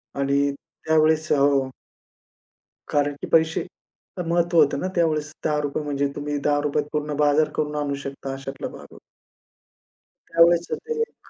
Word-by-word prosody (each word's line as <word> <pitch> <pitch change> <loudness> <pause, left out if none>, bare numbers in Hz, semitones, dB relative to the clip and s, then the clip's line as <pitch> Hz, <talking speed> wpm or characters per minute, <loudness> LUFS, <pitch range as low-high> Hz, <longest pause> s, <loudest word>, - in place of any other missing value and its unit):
आणि 140 0 +1 0.2
त्यावेळेस 155 0 0
हो. 140 -2 +3 1.2
कारण 145 0 +1
की - - -4
पैसे 160 +2 +2 0.6
महत्त्व 170 0 +1
होतं 145 -3 +5
ना 185 - -2
त्यावेळेस. 155 -2 0
₹10 150 -1 -1
म्हणजे 140 -1 -1
तुम्ही 145 0 -3
₹10 145 0 +1
त - - -16
पूर्ण 150 0 -2
बाजार 150 +1 +3
करून 150 0 -1
आणू 140 -1 -2
शकता, 135 0 -5
अशातला 135 0 -6
भाग - - -11
होता. - - -14 1.3
त्यावेळेस 170 0 +4 0.2
ते 460 -1 -3
एक, 455 - -6
150 Hz, 140 wpm, -23 LUFS, 140-160 Hz, 1.3 s, होतं